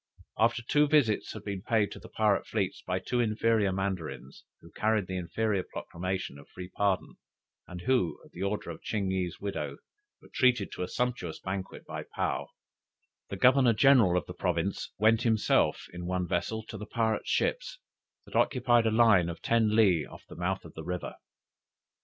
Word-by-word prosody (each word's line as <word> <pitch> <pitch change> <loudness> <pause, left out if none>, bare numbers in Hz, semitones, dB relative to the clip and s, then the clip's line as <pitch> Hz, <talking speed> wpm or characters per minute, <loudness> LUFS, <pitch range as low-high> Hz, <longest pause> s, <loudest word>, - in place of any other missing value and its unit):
After 115 +2 +2
two 150 +5 +3
visits 140 -8 +2
had 110 - -8
been 100 -3 -4
paid 105 0 +1
to - - -8
the - - -13
pirate 105 -2 +1
fleets 100 -4 -2
by 90 0 -2
two 120 +6 -2
inferior 110 -2 +2
Mandarins, 95 -4 -4 0.2
who - - -16
carried 110 -2 +1
the 95 - -5
Imperial 100 +2 -1
proclamation 90 -4 -4
of 70 - -16
free 90 -1 -9
pardon, 100 -1 -1 0.5
and 90 -1 -8
who, 120 -5 +1
at - - -19
the 90 - -9
order 100 -3 -2
of 80 - -10
Ching 100 -3 -2
yih's 90 -2 -2
widow, 100 -1 -4 0.4
were - - -19
treated 125 -6 +2
to - - -6
a 90 - -1
sumptuous 125 -10 -2
banquet 95 0 -5
by - - -6
Paou, - - -1 0.8
the 100 - -5
Governor 125 +2 +5
general 115 -7 +5
of 85 - -1
the - - -8
province - - -2
went 110 +2 +4
himself 110 -3 +2
in 90 0 -6
one 90 -1 -1
vessel 110 +6 -1
to 110 -1 -9
the 105 - -7
pirates' 110 -2 -1
ships, - - 0 0.5
that - - -12
occupied 120 -3 +3
a - - +2
line 110 -7 +5
of 85 - -6
ten 110 -2 +2
le 95 -8 +4
off - - -13
the - - -11
mouth 95 +2 -2
of 85 - -11
the 80 - -8
river. 90 +1 -4
105 Hz, 180 wpm, -29 LUFS, 90-115 Hz, 0.8 s, Governor